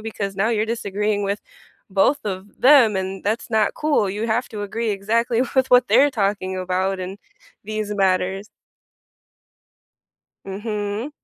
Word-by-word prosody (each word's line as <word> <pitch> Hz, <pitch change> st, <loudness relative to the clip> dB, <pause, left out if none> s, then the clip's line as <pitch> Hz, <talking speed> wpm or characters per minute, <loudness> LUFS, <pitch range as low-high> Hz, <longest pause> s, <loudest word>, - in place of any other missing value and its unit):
because 205 Hz, -3 st, -5 dB
now 200 Hz, +3 st, +1 dB
you're 220 Hz, -2 st, +1 dB
disagreeing 210 Hz, -2 st, -1 dB
with 200 Hz, +1 st, -2 dB, 0.5 s
both 200 Hz, +9 st, +2 dB
of 195 Hz, 0 st, -6 dB
them, 255 Hz, -5 st, +6 dB
and 190 Hz, 0 st, -4 dB
that's 220 Hz, +3 st, -2 dB
not 220 Hz, -2 st, +2 dB
cool. 295 Hz, -9 st, +1 dB
You 210 Hz, +4 st, -3 dB
have 240 Hz, +3 st, 0 dB
to 210 Hz, -3 st, -5 dB
agree 220 Hz, +3 st, -2 dB
exactly 230 Hz, +4 st, +1 dB
with 260 Hz, 0 st, +4 dB
what 250 Hz, 0 st, +6 dB
they're 255 Hz, +8 st, +5 dB
talking 195 Hz, -4 st, -1 dB
about 185 Hz, +1 st, -1 dB
in 185 Hz, +1 st, -5 dB, 0.5 s
these 215 Hz, 0 st, -3 dB
matters. 190 Hz, 0 st, 0 dB, 2.0 s
Mhm. 205 Hz, +4 st, -4 dB
210 Hz, 140 wpm, -22 LUFS, 195-230 Hz, 2.0 s, them